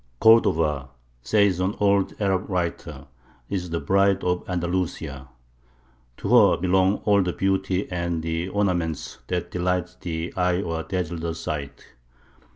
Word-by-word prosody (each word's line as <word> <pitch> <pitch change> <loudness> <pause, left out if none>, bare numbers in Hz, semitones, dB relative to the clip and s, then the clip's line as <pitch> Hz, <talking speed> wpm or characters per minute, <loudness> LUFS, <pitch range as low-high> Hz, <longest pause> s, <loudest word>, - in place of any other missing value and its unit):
"Cordova," 80 -11 +4 0.3
says 100 - +2
an 95 +3 0
old 100 -1 +2
Arab 95 -1 0
writer, 85 -6 -3 0.5
"is 90 -3 -2
the 85 0 -2
Bride 100 +5 +2
of 90 0 0
Andalusia. 85 -6 -3 0.9
To - - -4
her - - +6
belong 95 +2 +2
all 100 -1 +4
the 90 -2 -1
beauty 95 0 0
and 85 -2 -2
the 80 +2 -2
ornaments 90 -6 -1
that 90 -1 -3
delight 90 -1 -1
the 85 -1 -4
eye 90 -1 +1
or 80 -4 -2
dazzle 85 -2 -3
the 80 0 -3
sight. 70 -4 -6
90 Hz, 135 wpm, -24 LUFS, 80-95 Hz, 0.9 s, her